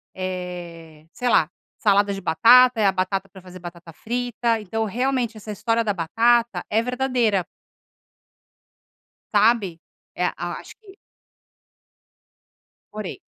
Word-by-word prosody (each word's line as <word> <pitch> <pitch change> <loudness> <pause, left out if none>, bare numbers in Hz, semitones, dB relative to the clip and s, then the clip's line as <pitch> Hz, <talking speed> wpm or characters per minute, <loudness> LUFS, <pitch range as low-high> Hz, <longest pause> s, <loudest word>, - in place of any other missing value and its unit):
eh, 175 -4 -7
sei 250 0 -2
lá, - - +4 0.3
salada 205 -1 +3
de 195 - -6
batata, 240 +8 +6
é - - +3
a - - +4
batata 190 +1 -2
pra 190 - -14
fazer 185 0 -12
batata 170 -1 -10
frita." 235 +2 -2
Então 220 +2 -3
realmente 245 0 -1
essa 215 0 -8
história 230 +3 0
da 205 -2 0
batata 230 +7 +1
é 220 +2 +3
verdadeira. 245 -6 0 1.9
Sabe? 205 -5 +3 0.3
É - - 0
a - - -5
acho - - -12
que 390 -2 -16 2.0
Morei. 210 -3 -6
210 Hz, 120 wpm, -23 LUFS, 185-235 Hz, 2.0 s, batata